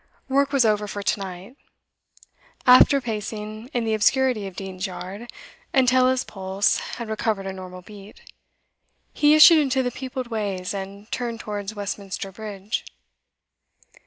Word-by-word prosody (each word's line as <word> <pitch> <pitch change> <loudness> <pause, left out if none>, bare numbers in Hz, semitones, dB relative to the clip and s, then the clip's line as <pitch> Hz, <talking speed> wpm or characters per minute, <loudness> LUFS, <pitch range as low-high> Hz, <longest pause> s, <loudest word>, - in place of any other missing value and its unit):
Work 275 +1 +2
was 275 -4 +3
over 210 -1 +1
for 205 0 -5
to 200 - 0
night. 190 +6 -8 1.1
After 255 +2 +7
pacing 215 -1 -5
in 240 -4 -1
the 220 - 0
obscurity 225 -1 +2
of 190 - -10
Dean's 190 0 -5
Yard 190 +5 -8 0.5
until 255 -1 +4
his 260 0 +1
pulse 190 0 0 0.2
had 235 -2 -5
recovered 215 -2 -2
a 190 - -4
normal 185 -1 -9
beat, 205 +1 -13 0.9
he 295 +1 +5
issued 315 +1 +9
into 265 -3 +1
the 245 - -1
peopled 255 -1 -6
ways, 200 -5 -3
and 200 +2 -7
turned 235 -2 -3
towards 205 -1 -5
Westminster 200 -1 -5
Bridge. 205 0 -5
215 Hz, 140 wpm, -23 LUFS, 195-250 Hz, 1.1 s, issued